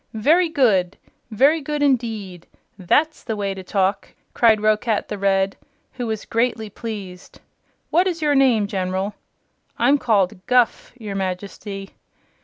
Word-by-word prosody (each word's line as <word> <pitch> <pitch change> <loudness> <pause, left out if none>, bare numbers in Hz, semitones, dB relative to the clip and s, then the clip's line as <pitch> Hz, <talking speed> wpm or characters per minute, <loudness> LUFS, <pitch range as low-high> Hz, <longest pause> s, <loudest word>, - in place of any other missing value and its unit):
"Very 325 +11 +3
good! 210 - +2 0.3
Very 280 +8 +3
good, 295 +1 -2
indeed! 220 -10 -1 0.3
That's 290 - +1
the 225 - -3
way 200 -1 -2
to 190 - -8
talk!" 190 +1 -1 0.2
cried 225 -2 +4
Roquat 215 +1 0
the 210 - -4
Red, 195 0 +1 0.4
who 250 -2 -4
was 220 -1 -4
greatly 230 -2 -1
pleased. 195 -5 -8 0.5
"What 355 +4 +3
is 345 -3 -2
your 300 -2 +1
name, 255 -6 +3
General?" 190 0 -2 0.6
"I'm 285 +1 +3
called 195 -7 +1
Guph, 250 -2 +2
your 215 -4 -6
Majesty." 195 +1 -5
215 Hz, 135 wpm, -21 LUFS, 195-255 Hz, 0.6 s, cried